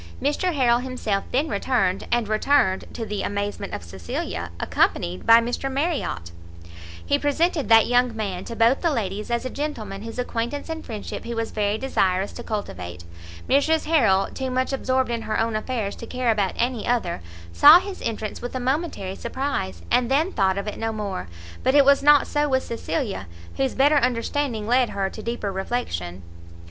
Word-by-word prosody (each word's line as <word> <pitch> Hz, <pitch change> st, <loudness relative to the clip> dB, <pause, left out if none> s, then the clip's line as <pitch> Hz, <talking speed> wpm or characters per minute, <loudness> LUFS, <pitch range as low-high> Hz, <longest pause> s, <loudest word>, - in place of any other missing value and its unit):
Mr 295 Hz, +6 st, 0 dB
Harrel 240 Hz, -3 st, +3 dB
himself 250 Hz, -6 st, -2 dB
then 280 Hz, +5 st, +1 dB
returned, 200 Hz, -4 st, 0 dB
and 240 Hz, -2 st, +1 dB
returned, 215 Hz, -2 st, +2 dB
to 230 Hz, -, -5 dB
the 210 Hz, -2 st, -3 dB
amazement 200 Hz, 0 st, -3 dB
of -, -, -5 dB
Cecilia, 85 Hz, -1 st, -5 dB
accompanied 90 Hz, +1 st, 0 dB
by 230 Hz, 0 st, +9 dB
Mr 245 Hz, +3 st, -2 dB
Marriot. 275 Hz, -, -2 dB, 0.7 s
He -, -, +2 dB
presented 295 Hz, 0 st, +1 dB
that 225 Hz, -1 st, +7 dB
young 245 Hz, -1 st, +2 dB
man 195 Hz, -4 st, -3 dB
to 230 Hz, -, -6 dB
both 230 Hz, +4 st, +3 dB
the 340 Hz, -, +2 dB
ladies 210 Hz, -, -2 dB
as 235 Hz, +1 st, -1 dB
a -, -, -2 dB
gentleman 220 Hz, -10 st, -4 dB
whose 225 Hz, +2 st, -7 dB
acquaintance 250 Hz, +4 st, -3 dB
and 320 Hz, 0 st, -4 dB
friendship 215 Hz, -3 st, -6 dB
he 235 Hz, 0 st, -5 dB
was 230 Hz, 0 st, -2 dB
very 210 Hz, 0 st, 0 dB
desirous 195 Hz, -7 st, 0 dB
to -, -, -8 dB
cultivate. 90 Hz, -, -5 dB, 0.4 s
Mrs 315 Hz, +4 st, +2 dB
Harrel, 220 Hz, -12 st, +3 dB
too 265 Hz, -1 st, -3 dB
much 255 Hz, +1 st, -1 dB
absorbed 260 Hz, -1 st, 0 dB
in 230 Hz, -1 st, -2 dB
her 215 Hz, -, -2 dB
own 225 Hz, 0 st, 0 dB
affairs 215 Hz, -2 st, -2 dB
to 230 Hz, -, -8 dB
care 250 Hz, -2 st, 0 dB
about 205 Hz, -4 st, 0 dB
any 240 Hz, -2 st, -1 dB
other, 225 Hz, -, 0 dB, 0.3 s
saw 300 Hz, +4 st, +9 dB
his 390 Hz, 0 st, -7 dB
entrance 215 Hz, -2 st, -4 dB
with 245 Hz, +1 st, -6 dB
a -, -, -1 dB
momentary 260 Hz, -, -2 dB
surprise, 235 Hz, -, -3 dB
and 245 Hz, -1 st, +3 dB
then 305 Hz, +7 st, +2 dB
thought 190 Hz, -2 st, +2 dB
of 200 Hz, -, -3 dB
it 210 Hz, -, -5 dB
no 225 Hz, 0 st, -1 dB
more; 200 Hz, -, -4 dB, 0.3 s
but 260 Hz, -, +2 dB
it 285 Hz, -1 st, +7 dB
was 280 Hz, 0 st, +5 dB
not 295 Hz, 0 st, +6 dB
so 295 Hz, 0 st, 0 dB
with 260 Hz, -1 st, +1 dB
Cecilia, 230 Hz, -, -3 dB, 0.3 s
whose 270 Hz, -1 st, 0 dB
better 290 Hz, +3 st, +4 dB
understanding 250 Hz, -2 st, 0 dB
led 245 Hz, +2 st, +3 dB
her 195 Hz, -1 st, -2 dB
to 215 Hz, -, -8 dB
deeper 230 Hz, -3 st, -3 dB
reflection. 95 Hz, -, -3 dB
235 Hz, 180 wpm, -24 LUFS, 200-265 Hz, 0.7 s, by